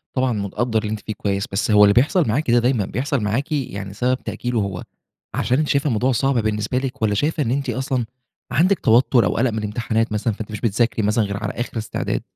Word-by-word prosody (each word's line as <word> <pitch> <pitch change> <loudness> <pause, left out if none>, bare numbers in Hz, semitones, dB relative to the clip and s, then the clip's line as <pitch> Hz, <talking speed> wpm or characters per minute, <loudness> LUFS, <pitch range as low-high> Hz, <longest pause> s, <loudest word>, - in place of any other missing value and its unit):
طبعًا 130 -2 +1
متقدَّر 110 +3 -1
اللي 105 -1 -4
أنتِ 110 - -3
فيه 110 - -5
كويس، 100 -1 -2
بس 105 +2 0
هو 105 0 +7
اللي 100 0 +6
بيحصَل 150 - +3
معاكِ 125 +3 0
ده 120 - +5
دايمًا 120 -4 +1
بيحصَل 135 +6 -1
معاكِ؟ 120 +9 -1
يعني 100 -9 -3
سبب 125 +4 0
تأجيله 120 -2 -2
هو 100 -3 -3 0.5
عشان 125 +2 +1
أنتِ 155 - 0
شايفة 140 +1 +1
الموضوع 125 +2 +1
صعب 135 +3 +1
بالنسبة 110 +2 -1
لِك، 130 0 -3
والّا 105 -2 +2
شايفة 150 +5 0
إن 115 - -1
أنتِ 135 -1 -1
أصلًا 130 0 -1 0.5
عندِك 185 +4 +3
توتر 120 -1 +4
أو 90 - 0
قلق 125 +1 +2
من 110 - -4
الامتحانات 110 +1 -1
مثلًا، 105 +1 0
فأنتِ 110 +1 -7
مش 105 - -6
بتذاكري 115 0 +1
مثلًا 110 +1 +2
غير 100 0 -3
على - - -2
آخر 120 -1 -4
استعداد؟ 110 - -2
115 Hz, 225 wpm, -21 LUFS, 105-130 Hz, 0.5 s, هو